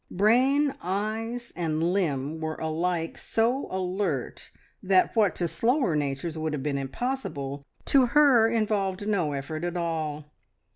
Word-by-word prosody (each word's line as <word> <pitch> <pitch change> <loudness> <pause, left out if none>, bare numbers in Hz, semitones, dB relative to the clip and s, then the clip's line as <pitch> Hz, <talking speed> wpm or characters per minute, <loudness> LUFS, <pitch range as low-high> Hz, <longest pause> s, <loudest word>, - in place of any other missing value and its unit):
Brain, 260 +8 +3
eyes, 220 +6 -3
and 165 0 0
limb 155 -5 -1
were 160 0 -3
alike 165 +1 -2
so 240 +5 0
alert 185 -7 -2 0.3
that 185 +2 +3
what 215 -4 +3
to 175 - -1
slower 240 - +1
natures 150 +3 -2
would 155 -1 -2
have 140 -3 -3
been 140 -2 -1
impossible, 140 - -4 0.2
to 265 -3 +5
her 250 -4 +5
involved 205 -3 0
no 180 -8 +1
effort 150 +4 -4
at 175 0 -2
all. 155 -3 -2
180 Hz, 135 wpm, -27 LUFS, 155-225 Hz, 0.3 s, to